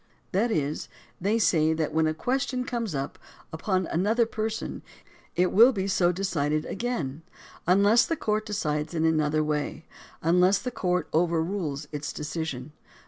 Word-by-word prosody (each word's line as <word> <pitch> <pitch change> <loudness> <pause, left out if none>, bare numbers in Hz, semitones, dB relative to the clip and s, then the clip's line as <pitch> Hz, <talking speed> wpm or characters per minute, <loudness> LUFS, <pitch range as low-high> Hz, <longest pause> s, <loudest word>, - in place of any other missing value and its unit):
That 210 +6 +2
is, 150 -7 -1 0.3
they 205 +5 +2
say 160 -7 +3
that 160 -1 -2
when 160 0 +3
a 155 - -1
question 255 - -1
comes 230 -10 -3
up 135 +1 -4 0.3
upon 185 +3 0
another 210 +9 +2
person, 220 0 -4 0.5
it 180 +1 +2
will 235 +6 +7
be 195 -5 -2
so 180 -2 +3
decided 155 -5 -1
again, 175 - -3 0.5
unless 200 +6 +5
the 330 - 0
court 215 -2 -1
decides 155 -6 -2
in 160 0 +1
another 155 -1 +2
way, 150 +1 -2 0.4
unless 180 +4 +4
the 250 +3 -4
court 180 -6 -1
overrules 165 -3 0
its 150 -1 -4
decision. 150 -3 -4
175 Hz, 145 wpm, -27 LUFS, 155-210 Hz, 0.5 s, will